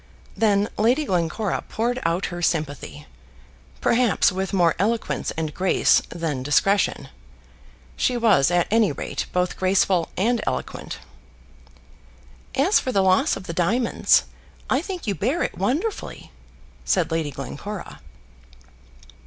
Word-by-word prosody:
Then 205 -2 +2
Lady 250 +8 +3
Glencora 180 - -1
poured 240 +3 -1
out 170 +3 0
her 175 - -5
sympathy, 155 -5 -2 0.8
perhaps 235 -4 +3
with 190 +1 -3
more 175 -5 +3
eloquence 220 +3 -1
and 155 -2 -3
grace 185 +3 +3
than 160 -6 -3
discretion. 145 0 +1 0.9
She 250 - 0
was, 205 - +4
at 175 -1 +2
any 220 -4 +3
rate, 140 - -4
both 180 0 -1
graceful 185 -2 +2
and 230 +4 +1
eloquent. - - -4 1.6
"As 340 +10 +4
for 255 - -3
the 195 -5 +2
loss 190 +11 +3
of 195 - -9
the 170 - -6
diamonds, 220 +8 +2 0.5
I 260 - +3
think 370 0 -6
you 205 - 0
bear 245 - -1
it - - -3
wonderfully," 300 - -3 0.5
said 175 -3 +1
Lady 160 -2 -1
Glencora. 160 +9 -7
195 Hz, 125 wpm, -23 LUFS, 170-230 Hz, 1.6 s, was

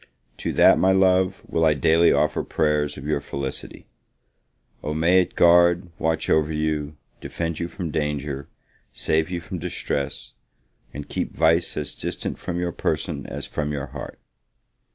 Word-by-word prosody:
To - - -3
that, - - +6
my 95 - +4
love, 95 0 +3
will 80 - 0
I 80 -2 +4
daily 80 +4 +4
offer - - +2
prayers 75 -1 0
for - - -9
your 75 0 -1
felicity. 70 -1 -6 1.0
O 75 +1 -3
may 85 +4 +4
it 90 - -5
guard, 85 +1 +5
watch 80 0 0
over 80 0 +2
you, 75 -1 -2 0.2
defend 85 -1 -4
you 85 - -2
from 85 -3 -5
danger, 75 -2 -3 0.4
save 80 +1 0
you 90 -1 -3
from 90 +2 -6
distress, 70 -7 -3 0.6
and 70 +3 -7
keep - - -4
vice 80 +1 +2
as 75 - -3
distant - - -4
from 85 -1 -4
your 90 0 -1
person - - -2
as - - -6
from 75 -1 -3
your 70 -2 -3
heart! - - -7
80 Hz, 155 wpm, -23 LUFS, 75-85 Hz, 1.0 s, that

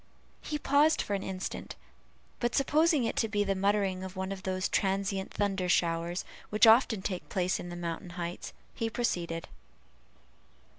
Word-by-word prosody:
He 300 - -3
paused 295 +2 +3
for 205 - -1
an 195 - 0
instant, 190 -1 -5 0.6
but 240 -1 0
supposing 305 +1 +3
it 225 - -1
to 225 - +2
be 205 -1 +1
the 195 -1 +1
muttering 195 -1 +1
of 190 +1 -7
one 190 +1 -3
of 195 -1 -5
those 185 0 -1
transient 195 -1 0
thunder 195 -3 -1
showers 170 +1 +1 0.2
which 210 +1 +5
often 225 -3 +5
take 185 -3 -4
place 185 -1 0
in 175 - -6
the 175 - -6
mountain 175 +1 -4
heights, 175 0 -4 0.2
he 225 - -2
proceeded. 170 -8 -2
195 Hz, 160 wpm, -30 LUFS, 180-220 Hz, 0.6 s, which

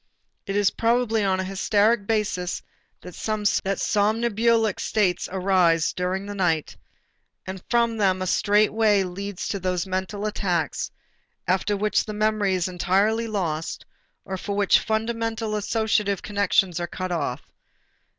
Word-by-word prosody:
It 195 - -2
is 205 -1 +3
probably 230 -2 +1
on 190 -1 +1
a - - 0
hysteric 205 +3 +1
basis 205 -5 -1 0.4
also 210 +4 -4 0.2
that 195 0 -1
somnambulic 225 +1 +2
states 190 -5 0
arise 180 -3 +2
during 185 +2 -2
the 205 - -6
night, 170 -6 0 0.7
and 190 -1 -7
from 235 -1 +2
them 190 -3 +2
a 185 - -2
straight 205 +3 +2
way 215 -3 +3
leads 195 +1 -5
to 200 - -2
those 180 -1 -1
mental 190 +2 -3
attacks 180 -7 -1 0.6
after 190 +3 +1
which 210 0 +1
the 215 - -5
memory 215 -2 +1
is 180 -1 0
entirely 195 +6 +1
lost, 165 -7 -3 0.4
or 190 - -4
for 200 +2 -4
which 205 -1 +4
fundamental 225 0 -2
associative 210 -2 0
connections 200 -3 +1
are 175 - -2
cut 185 +1 -5
off. 145 -6 -2
200 Hz, 140 wpm, -24 LUFS, 185-215 Hz, 0.7 s, which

